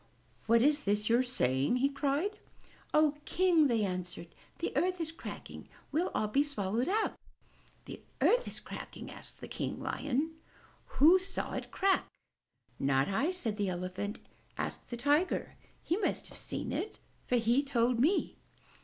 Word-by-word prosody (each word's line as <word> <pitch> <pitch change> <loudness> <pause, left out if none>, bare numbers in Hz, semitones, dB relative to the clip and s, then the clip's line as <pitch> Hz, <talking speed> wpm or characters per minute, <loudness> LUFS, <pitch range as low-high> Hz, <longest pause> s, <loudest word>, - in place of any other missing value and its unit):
''What 230 +1 +5
is 295 +1 +3
this 210 +1 +1
you 235 +1 +5
are - - +5
saying?'' 135 - +1
he 255 +2 +3
cried. 290 +9 -1 0.5
"Oh, 305 -1 +4
King!" 345 -4 +4
they 230 -4 +2
answered. 180 -2 -5 0.2
"The 335 - -3
earth 360 +5 +1
is 325 -1 -2
cracking! 325 - -9 0.2
We'll 330 +5 +1
all 215 - +1
be 270 +7 +3
swallowed 240 - -1
up!" 435 +3 +1 0.7
"The - - -8 0.2
earth - - +4
is - - -6
cracking?" - - -8
asked - - -10
King - - -3
Lion. 290 +3 -1 0.7
"Who 325 +7 +8
saw 385 +1 -4
it - - -4
crack?" 390 0 +2 0.7
"Not 135 +2 +2
I," 270 - +1
said 245 - -3
the 200 -2 0
Elephant. 185 +3 -3 0.4
"Ask - - -4
the 240 - -5
Tiger. 290 +8 +1 0.3
He 345 - +1
must 425 - -1
have - - -12
seen - - -4
it, 430 - -3 0.3
for 250 - +2
he 235 +3 +3
told 245 -4 +1
me!" 320 +11 +2
275 Hz, 155 wpm, -32 LUFS, 210-325 Hz, 0.7 s, Who